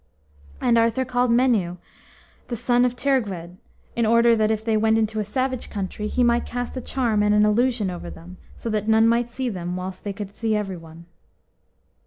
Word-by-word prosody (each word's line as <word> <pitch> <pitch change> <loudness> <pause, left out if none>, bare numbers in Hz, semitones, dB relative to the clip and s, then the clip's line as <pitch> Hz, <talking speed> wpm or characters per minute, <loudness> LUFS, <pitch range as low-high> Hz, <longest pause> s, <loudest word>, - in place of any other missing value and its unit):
And 235 -1 +3
Arthur 230 +3 +1
called 250 0 +1
Meneu, 230 -8 +2 0.7
the 240 - -3
son 245 +1 +2
of 250 0 -1
Teirgwed, 200 -11 -1 0.4
in 235 - +1
order 235 +1 +5
that, 215 -1 +2
if 220 0 -1
they 225 -1 +1
went 220 +1 +3
into 220 0 0
a - - 0
savage 255 +4 -2
country, 205 +1 -4
he 250 - +1
might 240 0 +3
cast 245 +1 -5
a 255 - -3
charm 235 -5 0
and 210 0 +3
an 210 0 +5
illusion 215 -2 +1
over 175 - -7
them, 180 +3 -12 0.2
so - - -7
that 215 -1 -1
none 220 0 +5
might 235 +1 +2
see 255 +2 -3
them, 180 -5 -4
whilst 185 0 -6
they 205 - -3
could 200 0 -7
see 220 0 -1
every 200 -3 -2
one. 165 0 -13
220 Hz, 200 wpm, -23 LUFS, 205-240 Hz, 0.7 s, order